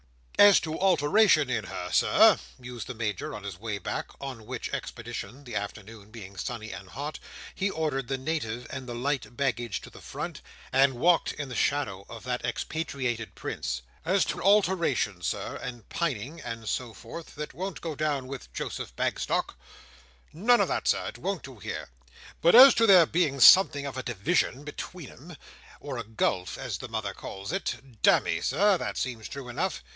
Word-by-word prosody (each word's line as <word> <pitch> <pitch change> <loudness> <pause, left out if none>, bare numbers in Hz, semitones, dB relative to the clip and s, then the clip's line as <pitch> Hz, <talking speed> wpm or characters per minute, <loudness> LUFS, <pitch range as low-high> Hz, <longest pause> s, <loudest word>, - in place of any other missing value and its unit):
"As 205 -1 +9
to 160 -1 -4
alteration 170 -4 +4
in 110 -5 -1
her, 90 -1 -5
Sir," - - +6 0.2
mused 125 -2 -8
the 125 - -6
Major 105 -4 -3
on 105 - -8
his 100 -3 -6
way 105 -1 -3
back; 95 - -4
on 130 -6 -7
which - - -5
expedition—the 120 +2 -6
afternoon 105 +1 -6
being 100 -4 -10
sunny 110 +3 -5
and 95 0 -9
hot—he 150 - -5
ordered 150 -7 -2
the 135 - -1
Native 130 -5 -3
and 130 -1 -6
the 120 - -4
light 135 0 -2
baggage 120 -6 -1
to - - -12
the - - -13
front, - - -6 0.3
and 135 0 +4
walked 170 +7 +3
in 145 -2 -5
the - - -6
shadow 100 -10 0
of 115 -1 -9
that 125 0 -3
expatriated 120 -2 -3
prince: 60 0 -4 0.2
"as 185 +4 +2
to - - -3
alteration, 170 - +2
Sir, - - -3
and 120 -3 -7
pining, 150 -1 -3
and 115 -2 -6
so 125 +1 -2
forth, 125 +9 -10
that 150 0 -6
won't 190 +2 -5
go 165 -2 -4
down 145 -3 -1
with 130 - -8
Joseph 60 - -5
Bagstock, - - -1 0.8
None 230 +9 +4
of - - +2
that, - - -1
Sir. - - +2
It - - -11
won't 195 -3 -3
do 130 -5 -11
here. 95 - -5 0.5
But 170 - +6
as 265 +2 +11
to 230 - +4
there 185 -4 +8
being 155 -5 0
something 145 -1 +8
of 140 - -5
a - - -1
division 130 - 0
between 150 +1 -7
'em—or 145 -3 -10
a - - -3
gulf 105 -4 -1
as 125 -6 -4
the 130 - -7
mother 110 -3 -3
calls 95 +4 -7
it—damme, 130 - +1
Sir, 190 - +3
that - - -4
seems 120 -4 -3
true 140 -3 -7
enough. 120 - -2
130 Hz, 175 wpm, -28 LUFS, 115-160 Hz, 0.8 s, as